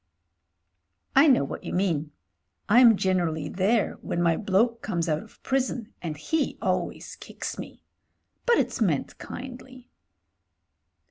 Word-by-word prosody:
*'I 275 +4 +7
know 260 - +5
what 140 - -6
you - - -5
mean. 165 -6 0 0.6
Tm 235 +1 +7
generally 175 -6 0
there 205 +4 +1
when - - -3
my 170 -1 +3
bloke 220 +5 +1
comes 170 -5 -2
out 155 -1 0
of 220 - -18
prison, 255 -4 -1
and 160 -4 -4
he 295 - -1
always - - -2
kicks - - -7
me. - - -9 0.6
But 475 - +5
it's - - -1
meant 165 -10 0
kindly." 255 0 -9
205 Hz, 130 wpm, -26 LUFS, 170-250 Hz, 0.6 s, I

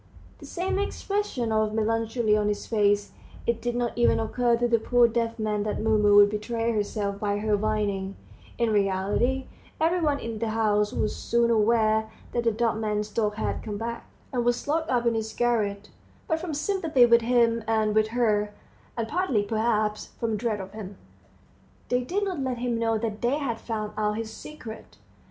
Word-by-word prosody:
the - - -11
same 375 +2 -2
expression 400 - -2
of 215 0 +1
melancholy 225 0 +1
on 210 -1 +1
his 210 0 -2
face. 205 -2 +1 0.3
It 235 -1 0
did 240 0 -2
not 240 -1 -1
even 240 - +3
occur 235 +1 +1
to 240 +1 +1
the 230 -1 +3
poor 245 +1 +4
deaf 230 0 -1
man 215 -2 -1
that 210 0 -2
Mumu 215 -2 +3
would 205 0 +7
betray 225 +2 -1
herself 205 -2 -2
by 205 -1 0
her 210 0 +1
whining; 205 -2 -1 0.4
in 235 -2 +1
reality, 205 +6 +1 0.3
everyone 320 -2 +2
in 230 -1 -5
the 225 0 -1
house 210 -1 +1
was 215 - -1
soon 235 0 +1
aware 220 0 +3 0.2
that 235 -1 -1
the 230 - +4
dumb 225 0 0
man's 210 -1 -1
dog 210 -1 0
had - - -2
come 210 -1 -5
back, 235 +2 -5 0.2
and 245 -2 +1
was 240 +2 0
locked 320 +2 0
up 245 -2 +1
in 235 - +3
his 220 -1 -2
garret, 210 -4 0 0.4
but 320 -1 0
from 325 -3 -4
sympathy 310 -5 +3
with 235 0 +5
him 230 -1 +2
and 220 -1 +2
with 215 0 +3
her, 210 -3 0 0.4
and 230 -1 -1
partly, 300 - +1
perhaps, 215 0 0
from 225 -2 0
dread 215 0 -1
of 190 0 -7
him, 200 -2 -8 0.9
they 250 0 +2
did 380 +11 -1
not 375 -6 -2
let 260 -2 -2
him 240 -1 -1
know 225 -1 +1
that 215 -1 -4
they 245 +4 +1
had 245 -6 -3
found 215 -3 -4
out 210 0 0
his 220 -1 -5
secret. 230 -8 -10
225 Hz, 185 wpm, -26 LUFS, 210-240 Hz, 0.9 s, would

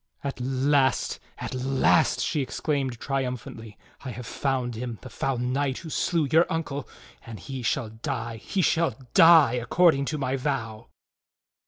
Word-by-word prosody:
"At 140 -2 -4
last, 135 +1 +1 0.2
at - - -6
last!" 135 +4 +2
she 150 - 0
exclaimed 135 -2 -2
triumphantly. 125 -5 -4 0.3
"I 135 - -5
have 125 0 -7
found 130 -3 -2
him, 115 0 -5
the 130 - -10
foul 135 +2 -2
knight 130 +2 -1
who 165 -2 -8
slew 165 -2 +1
your 165 +2 +4
uncle. 145 -4 -3 0.3
And 115 -3 -9
he 130 +7 -6
shall 115 0 -1
die, 115 +1 -5
he 185 - -2
shall 160 -8 +2 0.2
die, 165 -7 +7
according 140 +4 +3
to 155 - -2
my 135 -1 -1
vow!" 120 -5 -3
135 Hz, 150 wpm, -26 LUFS, 120-145 Hz, 0.3 s, die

